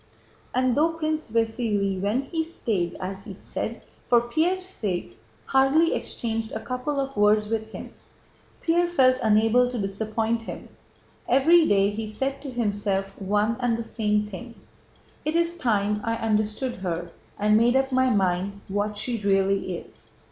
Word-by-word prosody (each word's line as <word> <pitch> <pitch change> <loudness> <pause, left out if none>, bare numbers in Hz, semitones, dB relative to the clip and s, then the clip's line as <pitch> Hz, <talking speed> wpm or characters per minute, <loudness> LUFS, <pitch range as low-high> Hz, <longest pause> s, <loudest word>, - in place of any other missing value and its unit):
And 255 0 +2
though 325 +3 +3
Prince 310 -3 -2
Vasíli, 220 -4 0
when 215 +7 0
he 325 +3 -2
stayed 210 - -2
in - - -11
(as 190 +1 -5
he 195 - -8
said) 225 +3 -5 0.2
for 240 - +6
Pierre's 325 +10 0
sake, 190 - -4 0.3
hardly 270 +5 +3
exchanged 225 -1 -3
a 220 - -2
couple 255 +5 -3
of 275 0 -3
words 210 0 +4
with 220 -1 -2
him, - - -8 0.7
Pierre 345 +1 +2
felt 260 -7 +4
unable 225 +3 +4
to 250 - -4
disappoint 220 +3 -1
him. 225 - -8 0.6
Every 315 +6 +5
day 200 0 +3
he 215 +1 -4
said 270 +6 -3
to 285 - -6
himself 205 -5 -1
one 210 +4 +1
and 245 -2 +1
the 230 - -3
same 210 -2 0
thing: 225 +4 -9 0.7
"It 305 +2 -1
is 340 0 +2
time 210 -7 0
I 230 -1 0
understood 215 +3 -1
her 175 -2 -4 0.3
and 210 +1 +3
made 235 +3 +4
up 265 0 +2
my 260 0 +3
mind 195 -1 0
what 205 +1 -1
she 235 +2 -2
really 195 -2 +1
is. - - -14
225 Hz, 160 wpm, -25 LUFS, 205-260 Hz, 0.7 s, for